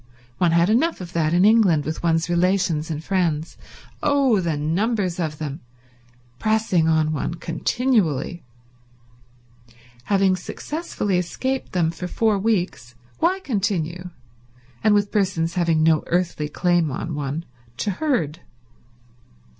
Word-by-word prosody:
One 175 Hz, -, +4 dB
had 170 Hz, +1 st, +4 dB
enough 320 Hz, +9 st, +2 dB
of 175 Hz, -2 st, -8 dB
that 155 Hz, -2 st, +1 dB
in 175 Hz, +3 st, +4 dB
England, 205 Hz, -9 st, +4 dB
with 155 Hz, 0 st, -4 dB
one's 165 Hz, -1 st, +1 dB
relations 175 Hz, -3 st, +1 dB
and 155 Hz, -1 st, -4 dB
friends—oh, 195 Hz, -, -1 dB
the 165 Hz, -4 st, -1 dB
numbers 185 Hz, +4 st, 0 dB
of 155 Hz, -3 st, -2 dB
them!—pressing 125 Hz, -, -3 dB
on 160 Hz, -1 st, +2 dB
one 155 Hz, +3 st, -2 dB
continually. 175 Hz, -, 0 dB, 1.6 s
Having 195 Hz, 0 st, +2 dB
successfully 205 Hz, -, -3 dB
escaped 260 Hz, +9 st, -3 dB
them 170 Hz, -3 st, +1 dB
for 180 Hz, +2 st, -6 dB
four 215 Hz, +2 st, +1 dB
weeks 180 Hz, -, -1 dB, 0.2 s
why 380 Hz, +2 st, +1 dB
continue, 185 Hz, -, -2 dB, 0.7 s
and 215 Hz, -1 st, +5 dB
with 205 Hz, 0 st, +1 dB
persons 180 Hz, -5 st, 0 dB
having 165 Hz, -3 st, +2 dB
no 160 Hz, -1 st, +3 dB
earthly 175 Hz, -4 st, -1 dB
claim 175 Hz, 0 st, +1 dB
on 160 Hz, +5 st, -4 dB
one, 145 Hz, +3 st, -3 dB, 0.3 s
to 205 Hz, -, -1 dB
herd? 185 Hz, -, -1 dB
175 Hz, 120 wpm, -22 LUFS, 155-205 Hz, 1.6 s, and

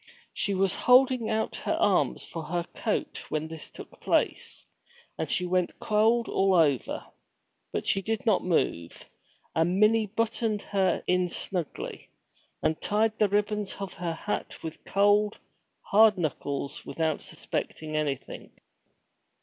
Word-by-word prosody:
She 200 Hz, -, -1 dB
was 190 Hz, -1 st, +2 dB
holding 250 Hz, -2 st, +4 dB
out 220 Hz, 0 st, -1 dB
her -, -, -1 dB
arms -, -, +2 dB
for 165 Hz, -, -6 dB
her 170 Hz, +2 st, -1 dB
coat -, -, -2 dB
when 155 Hz, 0 st, -2 dB
this 160 Hz, -1 st, -7 dB
took -, -, -12 dB
place, -, -, 0 dB, 0.5 s
and 160 Hz, -, -3 dB
she 180 Hz, -, 0 dB
went 180 Hz, 0 st, 0 dB
cold 225 Hz, +2 st, +2 dB
all 195 Hz, -1 st, +2 dB
over. 145 Hz, -7 st, +2 dB, 0.7 s
But -, -, -3 dB
she 195 Hz, -, +2 dB
did 220 Hz, +3 st, -2 dB
not 215 Hz, -5 st, +3 dB
move, 85 Hz, -, -1 dB, 0.5 s
and 175 Hz, +4 st, +1 dB
Minnie 215 Hz, +1 st, +4 dB
buttoned 225 Hz, 0 st, -1 dB
her 190 Hz, -3 st, +1 dB
in 180 Hz, 0 st, +2 dB
snugly, 175 Hz, -3 st, -4 dB, 0.5 s
and 160 Hz, -, 0 dB
tied 220 Hz, +1 st, +1 dB
the 210 Hz, -, +4 dB
ribbons 210 Hz, 0 st, 0 dB
of 195 Hz, -1 st, -6 dB
her 175 Hz, -2 st, -3 dB
hat 205 Hz, +5 st, -4 dB
with 160 Hz, -1 st, -7 dB
cold, 205 Hz, +1 st, +3 dB, 0.4 s
hard 215 Hz, 0 st, +5 dB
knuckles, 145 Hz, -4 st, -3 dB
without 160 Hz, -2 st, -1 dB
suspecting 155 Hz, -1 st, -4 dB
anything. 145 Hz, -3 st, -3 dB
195 Hz, 135 wpm, -28 LUFS, 165-215 Hz, 0.7 s, hard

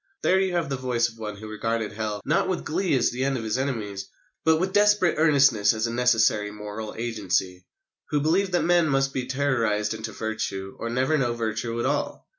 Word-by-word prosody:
There 190 Hz, -, +4 dB
you 190 Hz, -1 st, 0 dB
have 170 Hz, -3 st, 0 dB
the 135 Hz, -, -2 dB
voice 125 Hz, -2 st, 0 dB
of 115 Hz, 0 st, -17 dB
one 105 Hz, -2 st, -5 dB
who 110 Hz, +1 st, -9 dB
regarded 110 Hz, 0 st, -2 dB
Hell, 105 Hz, -1 st, -4 dB
not 155 Hz, +6 st, +1 dB
with 185 Hz, -, -2 dB
glee 175 Hz, -1 st, 0 dB
as 120 Hz, -, +2 dB
the 125 Hz, +2 st, -2 dB
end 135 Hz, -1 st, 0 dB
of 115 Hz, -, -5 dB
his 110 Hz, +3 st, -1 dB
enemies, 105 Hz, -8 st, -3 dB, 0.4 s
but 160 Hz, 0 st, +4 dB
with 190 Hz, +3 st, -1 dB
desperate 205 Hz, -3 st, +4 dB
earnestness 135 Hz, -9 st, +4 dB
as 110 Hz, +1 st, -1 dB
a 115 Hz, -, -3 dB
necessary 115 Hz, -4 st, +2 dB
moral 105 Hz, +1 st, -7 dB
agency 95 Hz, -5 st, -2 dB, 0.4 s
who 150 Hz, -, +1 dB
believed 180 Hz, +6 st, +1 dB
that 175 Hz, -, +2 dB
men 175 Hz, -2 st, +3 dB
must 135 Hz, 0 st, +1 dB
be 130 Hz, -2 st, -3 dB
terrorised 115 Hz, -6 st, 0 dB
into 110 Hz, 0 st, -6 dB
virtue 110 Hz, -4 st, -4 dB
or 115 Hz, -, -3 dB
never 130 Hz, +6 st, +1 dB
know 120 Hz, -3 st, +1 dB
virtue 115 Hz, +1 st, -3 dB
at -, -, -1 dB
all. 145 Hz, +2 st, -2 dB
120 Hz, 210 wpm, -25 LUFS, 110-145 Hz, 0.4 s, There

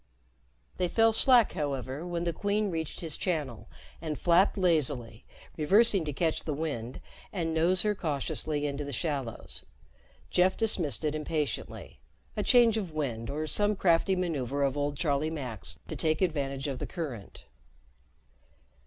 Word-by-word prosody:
They 180 Hz, -, +1 dB
fell 225 Hz, +4 st, +3 dB
slack, 240 Hz, 0 st, +5 dB
however, 140 Hz, +2 st, -3 dB
when 170 Hz, -1 st, -2 dB
the 170 Hz, -1 st, -1 dB
Queen 205 Hz, +3 st, 0 dB
reached 160 Hz, -2 st, -4 dB
his 160 Hz, -4 st, 0 dB
channel 150 Hz, -, -3 dB, 0.3 s
and 155 Hz, -2 st, -3 dB
flapped 180 Hz, +4 st, +3 dB
lazily, 145 Hz, -, 0 dB, 0.3 s
reversing 195 Hz, +3 st, +4 dB
to 150 Hz, -, -2 dB
catch 160 Hz, +3 st, 0 dB
the 150 Hz, -, -3 dB
wind 140 Hz, -6 st, -4 dB, 0.3 s
and 165 Hz, -4 st, -2 dB
nose 170 Hz, +3 st, +4 dB
her 210 Hz, -1 st, +2 dB
cautiously 150 Hz, -3 st, -2 dB
into 145 Hz, 0 st, -2 dB
the 140 Hz, -, -6 dB
shallows. 135 Hz, -4 st, -4 dB, 0.7 s
Jeff 185 Hz, +1 st, +3 dB
dismissed 180 Hz, -9 st, -1 dB
it 150 Hz, -, +1 dB
impatiently 155 Hz, -4 st, -3 dB, 0.4 s
a 210 Hz, -, 0 dB
change 230 Hz, +1 st, +5 dB
of 190 Hz, -6 st, -3 dB
wind 125 Hz, -7 st, -3 dB
or 150 Hz, +3 st, -2 dB
some 205 Hz, +6 st, +2 dB
crafty 185 Hz, 0 st, +3 dB
maneuver 145 Hz, -7 st, -1 dB
of 135 Hz, -1 st, +1 dB
old 145 Hz, 0 st, -1 dB
Charlie 145 Hz, +1 st, 0 dB
Mack's 120 Hz, -, -5 dB
to -, -, -5 dB
take 155 Hz, +2 st, +1 dB
advantage 140 Hz, -5 st, -1 dB
of 135 Hz, -2 st, -4 dB
the -, -, -4 dB
current. 140 Hz, -, -7 dB
155 Hz, 150 wpm, -29 LUFS, 140-180 Hz, 0.7 s, slack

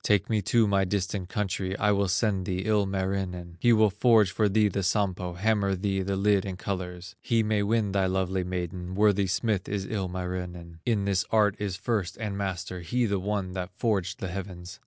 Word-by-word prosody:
Take 105 Hz, +1 st, +2 dB
me 110 Hz, -1 st, +2 dB
to 115 Hz, +3 st, +3 dB
my 100 Hz, -1 st, +2 dB
distant 95 Hz, -1 st, -2 dB
country, 95 Hz, -1 st, -2 dB
I 105 Hz, -, +2 dB
will 100 Hz, -1 st, +2 dB
send 95 Hz, -1 st, 0 dB
thee 95 Hz, 0 st, -2 dB
Ilmarinen, 95 Hz, -4 st, -1 dB
He 120 Hz, -, +4 dB
will 110 Hz, -2 st, +5 dB
forge 105 Hz, -2 st, +4 dB
for 105 Hz, +4 st, +2 dB
thee 105 Hz, +1 st, +3 dB
the 100 Hz, 0 st, -1 dB
Sampo, 95 Hz, -2 st, 0 dB
Hammer 100 Hz, +1 st, +1 dB
thee 95 Hz, 0 st, -1 dB
the 100 Hz, +1 st, -1 dB
lid 100 Hz, 0 st, +3 dB
in 95 Hz, -2 st, -5 dB
colors, 90 Hz, -2 st, -5 dB
He 115 Hz, -1 st, +2 dB
may 105 Hz, -1 st, +1 dB
win 105 Hz, 0 st, +1 dB
thy 95 Hz, -1 st, +2 dB
lovely 95 Hz, 0 st, 0 dB
maiden; 90 Hz, 0 st, -4 dB
Worthy 100 Hz, -1 st, +3 dB
smith 100 Hz, +1 st, 0 dB
is 100 Hz, -2 st, -2 dB
Ilmarinen, 90 Hz, -3 st, -4 dB
In 105 Hz, -4 st, +1 dB
this 100 Hz, -1 st, +1 dB
art 105 Hz, -2 st, +3 dB
is 100 Hz, -3 st, -2 dB
first 100 Hz, -2 st, -2 dB
and 105 Hz, -3 st, -3 dB
master; 95 Hz, -2 st, -3 dB
He, 120 Hz, +9 st, 0 dB
the 100 Hz, -3 st, 0 dB
one 100 Hz, -1 st, -2 dB
that 90 Hz, -1 st, -5 dB
forged 100 Hz, -5 st, 0 dB
the 95 Hz, -, -4 dB
heavens. 90 Hz, -1 st, -7 dB
95 Hz, 195 wpm, -27 LUFS, 90-105 Hz, -, will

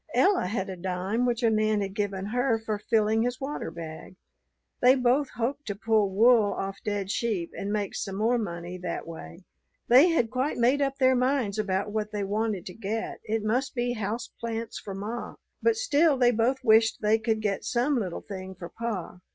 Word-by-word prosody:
Ella 385 Hz, -, +3 dB
had 195 Hz, -1 st, -2 dB
a 190 Hz, -, -5 dB
dime 190 Hz, +6 st, -1 dB
which 240 Hz, 0 st, -1 dB
a 230 Hz, -, +4 dB
man 215 Hz, -1 st, +2 dB
had 195 Hz, -1 st, -3 dB
given 200 Hz, -2 st, -2 dB
her 240 Hz, +2 st, +1 dB
for 220 Hz, -2 st, -3 dB
filling 220 Hz, 0 st, +2 dB
his 245 Hz, +2 st, -1 dB
water 280 Hz, +2 st, -4 dB
bag. 165 Hz, +2 st, -9 dB, 0.7 s
They 255 Hz, +1 st, +7 dB
both 260 Hz, +2 st, +2 dB
hoped 260 Hz, +5 st, -2 dB
to 205 Hz, -, -2 dB
pull 215 Hz, -1 st, +2 dB
wool 220 Hz, +1 st, +4 dB
off 195 Hz, 0 st, -4 dB
dead 205 Hz, -2 st, -2 dB
sheep 200 Hz, -6 st, -1 dB
and 200 Hz, -, -4 dB
make 205 Hz, -2 st, -1 dB
some 195 Hz, -, -4 dB
more 230 Hz, +4 st, +2 dB
money 175 Hz, -3 st, -5 dB
that 180 Hz, -, -4 dB
way. 165 Hz, +2 st, -10 dB, 0.5 s
They 265 Hz, +9 st, +7 dB
had 245 Hz, -9 st, +1 dB
quite 255 Hz, +4 st, -1 dB
made 250 Hz, +4 st, +3 dB
up 275 Hz, -1 st, 0 dB
their 260 Hz, -1 st, +4 dB
minds 250 Hz, -5 st, +1 dB
about 200 Hz, 0 st, -1 dB
what 215 Hz, 0 st, -2 dB
they 205 Hz, -1 st, -2 dB
wanted 205 Hz, -2 st, -1 dB
to 180 Hz, -, -7 dB
get: 220 Hz, +2 st, -4 dB
it 220 Hz, 0 st, -1 dB
must 250 Hz, +6 st, 0 dB
be 245 Hz, 0 st, 0 dB
house 220 Hz, +1 st, -3 dB
plants 230 Hz, -1 st, -4 dB
for 195 Hz, -2 st, -7 dB
ma; 215 Hz, +5 st, -5 dB, 0.3 s
but 455 Hz, -1 st, +3 dB
still 330 Hz, -, +3 dB
they 245 Hz, -1 st, +5 dB
both 245 Hz, +4 st, +1 dB
wished 225 Hz, -1 st, +4 dB
they 215 Hz, +1 st, +3 dB
could 220 Hz, 0 st, 0 dB
get 205 Hz, -3 st, -1 dB
some 255 Hz, +4 st, +1 dB
little 185 Hz, -6 st, -4 dB
thing 190 Hz, -1 st, -8 dB
for 175 Hz, -1 st, -8 dB
pa. 210 Hz, -6 st, -5 dB
220 Hz, 200 wpm, -27 LUFS, 200-245 Hz, 0.7 s, They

